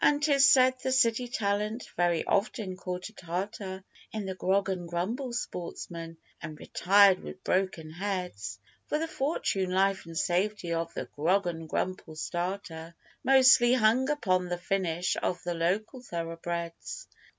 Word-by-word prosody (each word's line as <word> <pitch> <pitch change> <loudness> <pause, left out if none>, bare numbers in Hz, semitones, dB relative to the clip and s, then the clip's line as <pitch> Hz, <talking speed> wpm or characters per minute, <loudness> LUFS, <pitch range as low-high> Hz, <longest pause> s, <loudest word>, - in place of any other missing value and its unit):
An' 290 -1 +5
'tis 285 -2 +5
said 255 -1 +5
the 260 - -1
city 245 -1 +3
talent 210 +1 -1
very 175 -2 +1
often 200 -2 0
caught 180 +1 -5
a - - -20
tartar 190 +1 -5 0.3
In 215 -2 -4
the 190 - -3
Grog 190 +2 +1
an' 180 -3 -3
Grumble 220 +10 -2
sportsman, 170 -6 -5 0.2
'n' 155 -2 -6
retired 195 +4 +4
with 185 - -10
broken 185 -4 -1
heads, 180 - -4 0.3
For 300 - 0
the 325 +2 -2
fortune, 265 - -1
life, 190 0 +1
and 165 -1 -7
safety 180 0 0
of 165 0 -2
the - - -3
Grog 180 +7 +1
an' 165 -2 -4
Grumble 180 -1 -3
starter 175 -1 -4 0.3
Mostly 255 -2 +6
hung 245 +3 +3
upon 185 -11 +1
the 175 0 -2
finish 180 -1 -1
of 180 - -2
the 175 - -2
local 195 +9 -1
thoroughbreds. 170 - -5
190 Hz, 150 wpm, -29 LUFS, 170-220 Hz, 0.3 s, Mostly